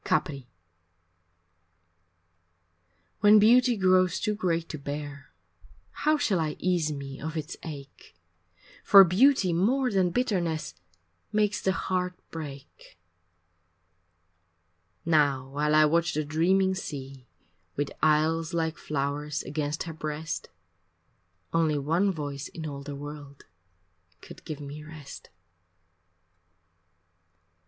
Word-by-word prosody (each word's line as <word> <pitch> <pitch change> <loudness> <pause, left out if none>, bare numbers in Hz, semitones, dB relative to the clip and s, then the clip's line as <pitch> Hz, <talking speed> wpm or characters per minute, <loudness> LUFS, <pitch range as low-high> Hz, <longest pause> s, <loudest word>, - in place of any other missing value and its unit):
IV - - -10
Capri 140 -7 -1 2.7
When 210 +1 +7
beauty 240 +3 +5
grows 185 -2 +3
too 215 - 0
great 170 -5 -1
to 155 - -6
bear 145 0 -6 0.6
How 305 0 +1
shall 215 - +1
I 155 -2 -1
ease 175 -4 0
me 140 -2 -7
of 160 +2 -4
its 155 +3 -5
ache, 140 - -10 0.7
For 195 -1 +9
beauty 190 +1 +3
more 250 +9 +2
than 190 -3 +2
bitterness 175 - -1 0.6
Makes 210 -1 +1
the 190 - +1
heart 180 -1 -2 0.2
break. 140 - -10 2.1
Now 145 -5 +2
while 150 +2 0
I 155 0 +7
watch 170 +2 +1
the 155 0 -1
dreaming 185 +5 +2
sea 135 -7 -7 0.5
With 145 0 -2
isles 160 +2 +2
like 160 -1 -1
flowers 145 +1 -3
against 150 0 -3
her 165 - -7
breast, 155 +1 -5 1.0
Only 160 -2 +2
one 165 +8 +1
voice 145 -4 -5
in 160 - -8
all 140 -2 -6
the 140 0 -7
world 145 -1 -9 0.7
Could - - -13
give 155 -2 -6
me 145 +1 -8
rest. 155 -2 -11
160 Hz, 110 wpm, -27 LUFS, 145-185 Hz, 2.7 s, For